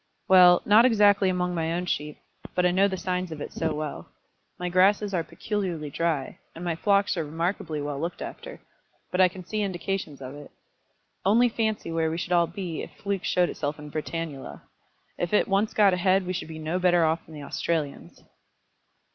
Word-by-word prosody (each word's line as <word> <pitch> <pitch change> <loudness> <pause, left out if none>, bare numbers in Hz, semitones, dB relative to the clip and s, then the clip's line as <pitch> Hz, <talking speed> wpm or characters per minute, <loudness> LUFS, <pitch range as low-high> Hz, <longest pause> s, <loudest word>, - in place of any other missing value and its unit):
"Well; 180 -2 +7
not 215 +3 +7
exactly 205 -5 +4
among 180 -1 -1
my 165 -1 -1
own 175 +1 -2
sheep; 150 -3 -3 0.4
but 180 - +2
I 180 - +4
know 190 +2 +4
the 190 -1 -3
signs 180 -1 -2
of 155 - -6
it - - -7
so 160 - -1
well. 150 -1 -5 0.5
My 180 - -3
grasses 195 +3 +3
are 170 -3 +1
peculiarly 175 -7 -4
dry, 160 -3 -2 0.2
and 170 +2 -7
my 170 -2 -1
flocks 200 +2 +2
are 165 - 0
remarkably 160 -1 -3
well 145 -1 -4
looked 170 +3 -4
after; - - -8 0.5
but 180 - +2
I 185 - +7
can 185 0 -10
see 215 +3 -2
indications 190 -5 -3
of 130 0 -8
it. 145 0 -11 0.7
Only 230 +6 +4
fancy 220 -6 -2
where 165 -1 0
we 160 - -3
should 175 +1 -2
all 170 -1 +4
be 170 -2 -5
if - - -7
fluke 200 -2 -3
showed 180 -1 +2
itself 145 0 -3
in 150 0 -10
Britannula! 155 -2 -5 0.6
If 175 - -2
it 210 - +3
once 200 +2 +1
got 205 -3 +4
ahead 185 +1 +2
we 185 - -2
should 180 - -4
be 160 -1 -8
no 160 +3 -2
better 175 -2 +4
off 160 +1 0
than 160 - -11
the 145 - -8
Australians." 150 0 -3
175 Hz, 195 wpm, -26 LUFS, 160-195 Hz, 0.7 s, Well